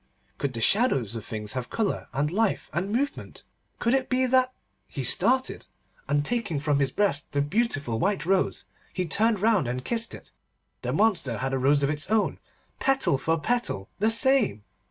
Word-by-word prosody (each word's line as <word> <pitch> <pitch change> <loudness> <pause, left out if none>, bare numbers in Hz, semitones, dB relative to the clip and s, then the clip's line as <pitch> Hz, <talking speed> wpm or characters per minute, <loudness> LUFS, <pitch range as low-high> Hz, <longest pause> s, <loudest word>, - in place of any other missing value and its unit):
Could 140 -2 -2
the 115 - -4
shadows 135 - +2
of 115 - -5
things 105 -1 -5
have 125 -2 -4
colour 220 -3 -2
and 145 +3 -1
life 220 +3 0
and 185 +4 -2
movement? 275 +6 -3 0.3
Could 235 - +1
it 265 -1 +1
be 255 0 +2
that—? 255 0 +3 0.4
He 135 - -5
started, 255 - +2 0.4
and 145 0 +1
taking 215 -10 -1
from 145 -1 +1
his 140 -1 +2
breast 195 -8 -1
the 145 - +1
beautiful 145 - -1
white 195 -1 0
rose, 190 +1 +1 0.3
he 185 - -1
turned 215 +4 +2
round, 215 - +3
and 125 +1 -4
kissed 230 -1 -1
it. - - -14 0.5
The - - -2
monster 185 - +1
had 135 +1 -2
a 135 - 0
rose 140 +2 +3
of 140 - +2
its 150 +3 -3
own, 220 -1 +1 0.4
petal 270 - +2
for 160 +4 0
petal 220 - -1
the 215 +2 +3
same! 230 - +3
185 Hz, 180 wpm, -26 LUFS, 140-230 Hz, 0.5 s, that